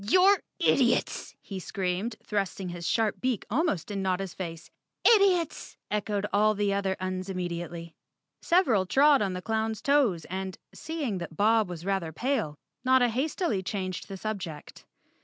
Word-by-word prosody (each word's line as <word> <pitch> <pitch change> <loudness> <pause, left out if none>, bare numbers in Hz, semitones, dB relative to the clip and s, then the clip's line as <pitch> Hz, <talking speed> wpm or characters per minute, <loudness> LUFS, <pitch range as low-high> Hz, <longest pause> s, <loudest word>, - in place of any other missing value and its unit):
"You're 380 +5 +6 0.2
idiots!" - - +2
he 195 -2 -6
screamed, 190 +4 -2
thrusting 195 -2 -2
his 175 -1 -5
sharp 220 -3 +1
beak 255 -5 -1
almost 255 - 0
in 200 -1 -2
Notta's 190 -1 -1
face. 165 -3 -7 0.3
"Idiots!" 390 -7 +3
echoed 205 -1 -1
all 215 +1 +4
the 200 -1 +1
other 195 -1 0
Uns 185 0 -3
immediately. 170 -2 -4 0.5
Several 250 - +3
trod 280 +4 +5
on 195 -2 0
the 180 0 -5
clown's 220 -1 -1
toes 265 - +2
and, 190 0 -5 0.2
seeing 290 - -3
that 170 -2 -7
Bob 220 -1 +3
was 175 -1 -7
rather 195 -5 -1
pale, 220 - -1 0.3
Notta 255 -1 +4
hastily 260 - -1
changed 185 -1 -4
the 195 - -6
subject. 185 -7 -6
200 Hz, 145 wpm, -28 LUFS, 185-240 Hz, 0.5 s, You're